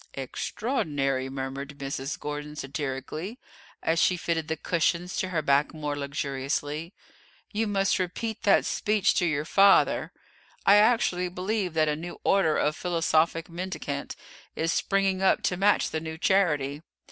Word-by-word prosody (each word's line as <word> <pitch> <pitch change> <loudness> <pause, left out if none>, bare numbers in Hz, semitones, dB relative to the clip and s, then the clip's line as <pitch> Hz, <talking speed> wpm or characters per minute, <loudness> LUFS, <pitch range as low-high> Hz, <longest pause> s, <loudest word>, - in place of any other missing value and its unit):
"Extraordinary!" 135 - -2
murmured 135 +1 -5
Mrs. 135 +1 -4
Gordon 150 0 -5
satirically, 145 - -5 0.5
as 165 +1 +2
she 180 +1 +3
fitted 165 -2 -2
the 160 0 -2
cushions 170 +2 0
to 185 - -1
her 160 -4 -1
back 140 +2 +2
more 150 -2 -3
luxuriously; 145 +2 -3 0.6
"you 220 +1 0
must 195 -1 +1
repeat 220 +5 -3
that 200 - +4
speech 210 -2 +1
to 175 - +1
your 150 -1 -1
father. 195 +3 +4 0.5
I 200 +1 +7
actually 210 -5 +3
believe 185 0 -2
that 155 -1 +3
a 150 - +1
new 170 +3 -7
order 180 -6 +3
of 150 +1 +1
philosophic 165 -2 +1
mendicant 170 -5 -5 0.4
is 165 +1 0
springing 195 -1 +1
up 190 - +3
to 180 - +1
match 200 +3 +2
the 160 - -1
new 160 0 -6
charity. 150 -7 +1
160 Hz, 145 wpm, -27 LUFS, 145-190 Hz, 0.6 s, I